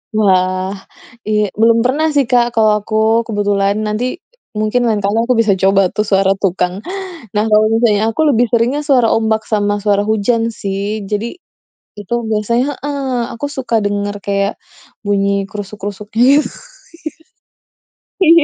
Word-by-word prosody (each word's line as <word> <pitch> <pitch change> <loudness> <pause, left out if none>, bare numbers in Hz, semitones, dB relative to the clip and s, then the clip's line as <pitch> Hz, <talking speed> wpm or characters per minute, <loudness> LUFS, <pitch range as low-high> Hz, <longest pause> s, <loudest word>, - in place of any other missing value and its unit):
Wah, 185 -2 +2 0.6
i 210 -2 +1
belum 230 +1 +3
pernah 295 +6 +1
sih, 280 - +4
Kak, 240 -1 +2
kalau 215 -1 +3
aku 220 +2 +1
kebetulan. 205 -2 0
Nanti 220 +7 -2 0.4
mungkin 215 +3 0
lain 210 -3 0
kali 205 +3 0
aku 250 - +2
bisa 225 -3 +3
coba 195 -1 +3
tuh 210 -1 -2
suara 195 -1 +3
tukang. 180 0 -1 0.6
Nah, 210 +1 +1
kalau 215 0 +4
misalnya 225 -2 +2
aku 315 +7 0
biasanya - - +4
lebih 240 +2 +3
seringnya 245 +5 +1
suara 260 -6 +3
ombak 220 -1 0
sama 205 -1 0
suara 205 0 +1
hujan, 225 +2 0
sih. 200 0 -4
Jadi 220 - -4 0.6
itu 205 +3 -5 0.2
biasanya 235 +6 0
heeh, 270 -4 -2
aku 285 +5 -4
suka 260 -5 -2
denger 205 0 -2
kayak 200 0 -1 0.5
bunyi 200 -1 +1
krusuk-krusuk 205 0 -7
gitu, 265 +7 +4 1.8
iya 335 -3 +6
215 Hz, 145 wpm, -16 LUFS, 200-235 Hz, 1.8 s, iya